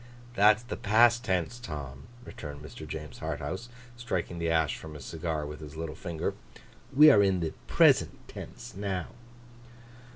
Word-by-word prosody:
'That's 105 +1 +5
the 120 - -5
past 120 +3 +4
tense, 95 +1 -1
Tom,' 70 - -7 0.2
returned 75 -1 -8
Mr. 75 +2 -9
James 75 -3 -7
Harthouse, 95 +12 -4 0.3
striking 90 -8 -3
the 85 0 0
ash 80 -2 +2
from 80 -1 -9
his 70 -3 -9
cigar 80 -2 -3
with 75 0 -7
his 75 -1 -9
little 80 -1 -4
finger. 80 0 -3 0.6
'We 150 +3 +9
are 100 - +6
in 95 -2 +3
the 80 -2 -2
present - - +4
tense, - - -9
now. 95 -3 -3
85 Hz, 155 wpm, -29 LUFS, 75-105 Hz, 0.6 s, We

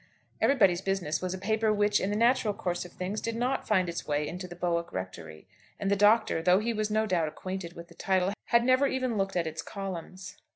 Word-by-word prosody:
'Everybody's 195 -10 +4
Business' 190 -6 -1
was 185 0 -2
a - - -6
paper 220 +3 +1
which, 205 0 +2
in 190 - -1
the 205 - -1
natural 230 -2 +2
course 175 -4 -3
of 175 - -11
things, 190 +4 -4
did 230 0 -3
not 250 +3 -1
find 185 -4 +2
its 170 0 -5
way 150 0 0
into 180 +3 -6
the 175 - -9
Bowick 170 -1 -1
Rectory; 85 -4 -7 0.3
and 200 -1 -1
the - - +4
Doctor, 210 -3 +4
though 180 +2 +5
he 230 +3 0
was 215 -1 -1
no 215 +1 +1
doubt 175 -6 +1
acquainted 185 +2 -6
with 170 -1 -10
the - - -16
title, 190 0 0
had 235 0 +3
never 255 +3 +4
even 255 -3 -1
looked 195 -2 -1
at 175 -2 +1
its 160 0 -4
columns. 185 0 -7
190 Hz, 225 wpm, -29 LUFS, 175-215 Hz, 0.3 s, though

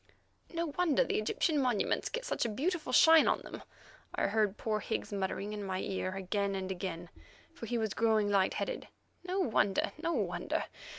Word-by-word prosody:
"No 335 -1 -1
wonder 335 -6 +4
the - - 0
Egyptian 290 +8 +1
monuments 250 -6 +1
get 485 +1 -4
such - - -1
a 235 - 0
beautiful 310 - -2
shine 320 +4 +7
on - - +2
them," - - -9 0.5
I - - +1
heard 215 -1 +1
poor 215 -1 -1
Higgs 215 - -3
muttering 200 +1 -2
in 205 -1 -4
my 190 -1 -2
ear 185 -1 -3
again 195 +1 -1
and 190 0 -3
again, 175 -2 -5 0.4
for 230 - -8
he 240 - -1
was 220 -3 -1
growing 220 -2 +2
light 195 -2 +2
headed; - - -3 0.4
"no 365 +1 -2
wonder, 205 - +1
no 335 - 0
wonder! 180 - -1
215 Hz, 180 wpm, -32 LUFS, 195-275 Hz, 0.5 s, shine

